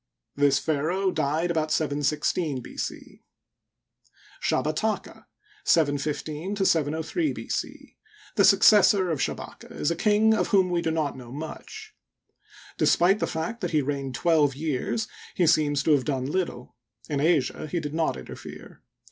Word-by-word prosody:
This 140 Hz, -1 st, +3 dB
pharaoh 165 Hz, +7 st, 0 dB
died 155 Hz, +2 st, 0 dB
about 155 Hz, -2 st, 0 dB
716 150 Hz, 0 st, 0 dB
B. -, -, -11 dB
C. -, -, -6 dB, 1.2 s
Shabataka 155 Hz, +9 st, -1 dB, 0.4 s
(715 150 Hz, +4 st, 0 dB
703 160 Hz, -, 0 dB
b. -, -, -8 dB
c), -, -, -5 dB, 0.4 s
the 200 Hz, -, +4 dB
successor 195 Hz, -2 st, +6 dB
of 150 Hz, -4 st, -2 dB
Sha -, -, 0 dB
baka, -, -, -11 dB
is 150 Hz, -, -1 dB
a -, -, 0 dB
king 215 Hz, +4 st, +3 dB
of 220 Hz, -, +1 dB
whom 190 Hz, -2 st, +3 dB
we 175 Hz, -1 st, +1 dB
do 165 Hz, -, -1 dB
not 160 Hz, -3 st, -1 dB
know 125 Hz, -2 st, -11 dB
much. 430 Hz, -, -8 dB, 0.9 s
Despite 190 Hz, +4 st, +4 dB
the -, -, 0 dB
fact 165 Hz, +9 st, -4 dB
that 180 Hz, -, -1 dB
he 155 Hz, -3 st, +1 dB
reigned 135 Hz, -2 st, -3 dB
twelve 150 Hz, 0 st, +2 dB
years, 155 Hz, -, -2 dB, 0.3 s
he 180 Hz, -, +2 dB
seems 145 Hz, -3 st, +2 dB
to 160 Hz, -, +2 dB
have 140 Hz, -4 st, +3 dB
done 135 Hz, -3 st, -1 dB
little. 145 Hz, -5 st, -3 dB, 0.3 s
In 145 Hz, -2 st, -2 dB
Asia 155 Hz, -2 st, +1 dB
he 175 Hz, +3 st, -2 dB
did 150 Hz, -2 st, -5 dB
not 160 Hz, -, 0 dB
interifere. 65 Hz, -, -11 dB
155 Hz, 150 wpm, -26 LUFS, 145-180 Hz, 1.2 s, successor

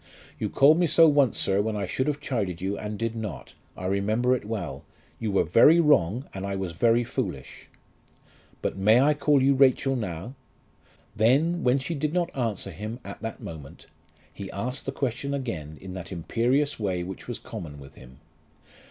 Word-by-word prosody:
"You -, -, -1 dB
called 150 Hz, +4 st, +5 dB
me 175 Hz, -, +3 dB
so 165 Hz, +1 st, +6 dB
once, 145 Hz, -5 st, +3 dB
sir, 95 Hz, +1 st, +2 dB
when 110 Hz, +1 st, -2 dB
I 100 Hz, -1 st, -2 dB
should 130 Hz, +9 st, -2 dB
have 145 Hz, -1 st, -1 dB
chided 105 Hz, -, -2 dB
you 95 Hz, +2 st, -2 dB
and 105 Hz, 0 st, -5 dB
did 115 Hz, +1 st, -2 dB
not. 110 Hz, -4 st, -6 dB, 0.2 s
I 90 Hz, -, -6 dB
remember 110 Hz, +6 st, +1 dB
it 120 Hz, -, -6 dB
well. 105 Hz, -7 st, -5 dB, 0.4 s
You 110 Hz, -2 st, -2 dB
were 95 Hz, -, +3 dB
very 130 Hz, -, +6 dB
wrong, 130 Hz, -, +3 dB
and 95 Hz, -, -6 dB
I 100 Hz, 0 st, -3 dB
was 95 Hz, -2 st, -3 dB
very 115 Hz, +7 st, +3 dB
foolish." 100 Hz, -, -5 dB, 1.0 s
"But -, -, 0 dB
I -, -, -13 dB
may 115 Hz, +9 st, +5 dB
call 145 Hz, -2 st, +2 dB
you 140 Hz, +1 st, +5 dB
Rachel 135 Hz, 0 st, +3 dB
now?" 100 Hz, 0 st, -5 dB, 0.8 s
Then, 145 Hz, +11 st, +2 dB
when 125 Hz, +1 st, +3 dB
she 140 Hz, +5 st, -3 dB
did 155 Hz, 0 st, -2 dB
not 175 Hz, -1 st, -1 dB
answer 110 Hz, -6 st, -2 dB
him 110 Hz, +7 st, -6 dB
at 100 Hz, -, -8 dB
the 115 Hz, -1 st, -4 dB
moment, 75 Hz, -4 st, -10 dB, 0.5 s
he 100 Hz, -, -7 dB
asked 125 Hz, +8 st, -5 dB
the -, -, 0 dB
question 140 Hz, +1 st, -2 dB
again 80 Hz, -, -5 dB
in 95 Hz, -1 st, -9 dB
that 95 Hz, 0 st, -8 dB
imperious 125 Hz, -, 0 dB
way 95 Hz, -4 st, -1 dB
which 95 Hz, +2 st, -8 dB
was 120 Hz, -, -4 dB
common 80 Hz, -10 st, -8 dB
with 70 Hz, 0 st, -13 dB
him. 65 Hz, -1 st, -15 dB
115 Hz, 185 wpm, -26 LUFS, 95-135 Hz, 1.0 s, so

